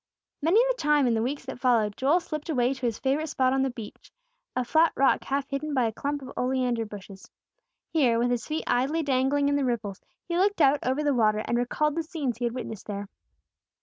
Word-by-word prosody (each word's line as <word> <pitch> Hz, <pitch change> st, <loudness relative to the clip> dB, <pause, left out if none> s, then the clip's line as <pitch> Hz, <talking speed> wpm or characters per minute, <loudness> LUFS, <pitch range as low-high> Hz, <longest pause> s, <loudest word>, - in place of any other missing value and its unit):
Many 335 Hz, +9 st, +4 dB
a -, -, +3 dB
time 300 Hz, -, +2 dB
in 240 Hz, -, +2 dB
the 220 Hz, -, +1 dB
weeks 265 Hz, +4 st, -3 dB
that 265 Hz, -, -7 dB
followed, 225 Hz, -5 st, +2 dB
Joel 285 Hz, +7 st, +3 dB
slipped 305 Hz, -1 st, -6 dB
away 255 Hz, -3 st, +2 dB
to 265 Hz, -1 st, -6 dB
his 230 Hz, -2 st, -2 dB
favorite 280 Hz, +4 st, 0 dB
spot 260 Hz, -4 st, +1 dB
on 270 Hz, -, +2 dB
the 270 Hz, -, +1 dB
beech, 230 Hz, -4 st, -10 dB, 0.4 s
a 255 Hz, -1 st, 0 dB
flat 320 Hz, +5 st, +4 dB
rock 275 Hz, -, +3 dB
half 275 Hz, 0 st, -1 dB
hidden 290 Hz, +2 st, -3 dB
by 255 Hz, -2 st, +3 dB
a 225 Hz, -, 0 dB
clump 285 Hz, +5 st, -3 dB
of 260 Hz, -, -8 dB
oleander 250 Hz, -2 st, 0 dB
bushes. 195 Hz, -2 st, -11 dB, 0.6 s
Here, 255 Hz, -8 st, +3 dB
with 245 Hz, +1 st, +1 dB
his 245 Hz, -2 st, -2 dB
feet 310 Hz, +1 st, -2 dB
idly 275 Hz, +7 st, +1 dB
dangling 280 Hz, +1 st, +1 dB
in 285 Hz, -, +2 dB
the 285 Hz, -, 0 dB
ripples, 215 Hz, -6 st, -2 dB, 0.3 s
he 345 Hz, 0 st, -1 dB
looked 405 Hz, 0 st, +2 dB
out 285 Hz, -1 st, +5 dB
over 260 Hz, +4 st, 0 dB
the 290 Hz, -1 st, +2 dB
water, 215 Hz, -3 st, +2 dB
and 235 Hz, -, -1 dB
recalled 265 Hz, +5 st, 0 dB
the 330 Hz, -, -1 dB
scenes 310 Hz, -7 st, -3 dB
he 245 Hz, -, -1 dB
had 235 Hz, 0 st, -2 dB
witnessed 225 Hz, -5 st, -6 dB
there. 200 Hz, -1 st, -5 dB
265 Hz, 225 wpm, -27 LUFS, 240-300 Hz, 0.6 s, out